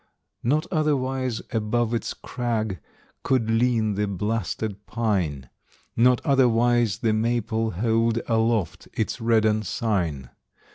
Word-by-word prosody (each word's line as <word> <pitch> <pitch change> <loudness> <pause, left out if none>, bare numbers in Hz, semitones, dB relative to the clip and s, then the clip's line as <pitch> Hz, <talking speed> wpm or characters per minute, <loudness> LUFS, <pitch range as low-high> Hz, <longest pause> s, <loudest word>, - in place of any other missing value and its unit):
Not 150 +7 +1
otherwise 130 -6 0
above 115 +1 0
its 115 - -2
crag 110 -6 -3 0.4
Could 115 -4 +1
lean 115 -2 +2
the 105 +1 -1
blasted 105 +1 -3
pine; 90 - -1 0.5
Not 125 +3 +3
otherwise 120 -5 +3
the 110 -2 +2
maple 115 0 0
hold 115 +3 +1
Aloft 110 -6 0
its 110 +2 -2
red 115 -1 +3
ensign. 105 - -1
115 Hz, 105 wpm, -24 LUFS, 105-120 Hz, 0.5 s, Not